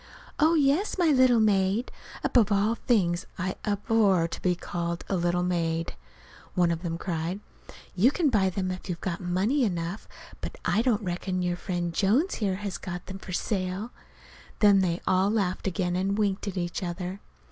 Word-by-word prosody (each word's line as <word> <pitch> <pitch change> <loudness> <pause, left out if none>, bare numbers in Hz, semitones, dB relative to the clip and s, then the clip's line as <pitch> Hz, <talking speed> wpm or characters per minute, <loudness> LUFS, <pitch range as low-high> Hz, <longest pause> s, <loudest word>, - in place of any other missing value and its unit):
"Oh, 320 +2 +5
yes, 300 +8 +2
my 345 -3 +3
little 255 -3 +5
maid" 205 +2 +2 0.3
(above 225 -4 +3
all 205 +3 +3
things 190 -8 +1
I 185 +1 -2
abhor 205 -4 +2
to - - -7
be 180 -1 +2
called 170 0 -4
a 195 - 0
little 175 0 +1
maid!) 165 -2 -1 0.6
one 175 -2 +3
of 165 -1 -2
them 165 -2 -3
cried. 170 +2 -3 0.5
"You 200 +8 +4
can 300 -1 +1
buy 195 -5 +3
them 185 0 -2
if 185 +1 -7
you've 170 -2 -3
got 170 -3 -3
money 190 +10 +1
enough; 175 -1 -2 0.3
but - - -5
I 215 - +2
don't 230 -4 +1
reckon 180 0 -2
our 175 - 0
friend 175 -1 -3
Jones 230 - +2
here 195 -3 +1
has 200 -1 -5
got 180 -1 -6
them 190 0 -8
for 190 - -9
sale." 190 +3 -2 0.7
Then 205 -2 +6
they 175 -2 0
all 185 +2 +3
laughed 200 -4 -1
again, 180 -2 -1
and 195 +2 0
winked 205 -1 0
at 195 - -4
each 175 +1 -2
other. 180 +1 -4
190 Hz, 180 wpm, -27 LUFS, 175-215 Hz, 0.7 s, Then